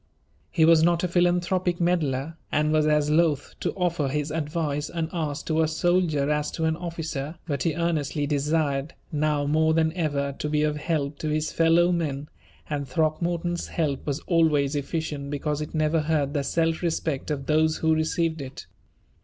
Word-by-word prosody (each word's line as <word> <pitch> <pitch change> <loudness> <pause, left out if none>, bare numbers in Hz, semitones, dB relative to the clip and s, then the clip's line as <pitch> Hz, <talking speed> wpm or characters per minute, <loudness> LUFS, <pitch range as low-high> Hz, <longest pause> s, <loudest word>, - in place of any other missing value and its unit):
He 160 - +3
was 165 -1 +6
not 170 +1 +3
a - - +2
philanthropic 175 0 +1
meddler, 160 -4 0 0.2
and 150 +1 +2
was 155 -1 +3
as 150 -1 +2
loath 155 -3 +2
to - - -1
offer 175 -6 0
his 150 +2 -2
advice 150 -2 -2
unasked 160 -3 -3
to 160 0 +1
a 160 - +3
soldier 160 -3 +1
as 150 0 0
to 160 - -1
an 160 0 +1
officer, 160 -3 -4
but 140 -5 -2
he 160 0 0
earnestly 155 -4 -1
desired, 145 0 0 0.2
now 150 -1 +1
more 160 +2 +2
than 160 -1 +2
ever, 145 -5 -1
to 150 - -2
be 150 0 +1
of 150 0 0
help 150 -2 -2
to 155 - -2
his 155 0 -1
fellow 165 +2 +4
men, 150 -4 -2 0.4
and 145 -2 -3
Throckmorton's 170 +4 -1
help 150 -5 -2
was 145 +2 -1
always 155 -5 +2
efficient 145 -1 -3
because 150 +1 -2
it 150 - -6
never 155 +1 +2
hurt 150 -2 0
the 145 -2 0
self 165 +2 0
respect 160 -5 -2
of 140 -3 -2
those 155 +1 +2
who 160 0 +2
received 160 0 0
it. 135 0 -8
155 Hz, 175 wpm, -25 LUFS, 145-165 Hz, 0.4 s, was